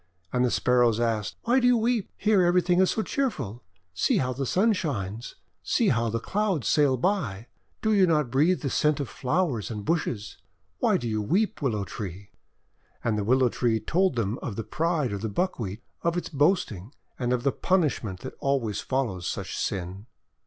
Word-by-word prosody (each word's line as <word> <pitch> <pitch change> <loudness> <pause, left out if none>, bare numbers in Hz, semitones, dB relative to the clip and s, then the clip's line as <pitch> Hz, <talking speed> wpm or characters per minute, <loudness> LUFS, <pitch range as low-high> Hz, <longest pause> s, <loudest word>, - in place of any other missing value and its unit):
And 125 0 +2
the 125 - +3
Sparrows 120 -2 +3
asked: 115 -3 -1
"Why 245 +3 +3
do 245 - +3
you 245 -1 +5
weep? 230 -2 0
Here 210 -2 +3
everything 175 0 +3
is 190 - +4
so 220 - 0
cheerful! 140 - -2 0.3
See 90 - +2
how 130 -1 0
the 135 +1 -3
Sun 215 - +3
shines. 115 - -4 0.3
See - - +2
how 115 0 +1
the 115 +1 -1
Clouds 195 - -1
sail 145 -4 +3
by. 125 - -1 0.4
Do 220 -1 +3
you 195 -3 +5
not 150 -7 +1
breathe 155 +8 +3
the 140 - -2
scent 150 -1 +2
of 140 - -2
flowers 130 - -1
and 105 -3 -5
bushes? 125 - -2 0.4
Why - - +3
do 120 - -4
you 110 -1 -1
weep, 190 - 0
Willow 110 -8 0
Tree 100 0 -7 0.4
?': - - -39
And 115 -2 +1
the 105 - -1
Willow 130 +3 +3
Tree 115 -2 0
told 185 - +1
them 115 0 -1
of 110 - -5
the 115 - -3
pride 160 -5 0
of 100 -1 -4
the 110 - -2
Buckwheat, 110 - -2 0.2
of 170 +1 0
its 175 - -3
boasting, 145 - 0 0.2
and 125 -1 0
of 125 -1 0
the 140 - +3
punishment 135 - 0
that 130 - -7
always 130 -7 0
follows 115 -10 -2
such - - -4
sin. 95 +3 -4
130 Hz, 190 wpm, -26 LUFS, 110-175 Hz, 0.4 s, you